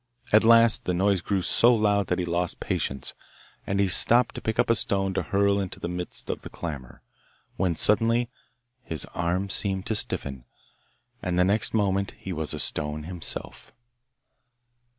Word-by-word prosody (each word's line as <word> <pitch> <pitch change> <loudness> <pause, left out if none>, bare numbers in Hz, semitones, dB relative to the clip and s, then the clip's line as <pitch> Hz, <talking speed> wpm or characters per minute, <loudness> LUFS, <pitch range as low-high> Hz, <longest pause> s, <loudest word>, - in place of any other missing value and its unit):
At 110 - +6
last 115 0 +5
the 90 - -1
noise 95 0 +1
grew 95 +1 -1
so 120 +6 +4
loud 105 -3 +1
that 90 - -1
he 90 - -2
lost 85 0 -2
patience, 65 -1 -3 0.5
and 100 0 -1
he 100 - +3
stooped 120 +6 +4
to - - -8
pick 110 0 -3
up - - +2
a - - +5
stone 95 -3 0
to - - -1
hurl 100 0 +1
into 95 -2 -5
the - - -4
midst 90 0 -6
of - - -6
the - - -9
clamour, 70 -7 -8 0.5
when 90 -3 0
suddenly 115 +6 +2 0.6
his 80 - -3
arm 90 +3 -2
seemed 95 -1 +1
to 110 - -2
stiffen, 70 -10 -2 0.8
and 90 -1 -2
the 90 - +4
next 105 +4 0
moment 100 -2 0
he 95 - -6
was 80 -2 -2
a - - -4
stone 75 +1 -1
himself! 85 0 -5
95 Hz, 170 wpm, -25 LUFS, 85-105 Hz, 0.8 s, At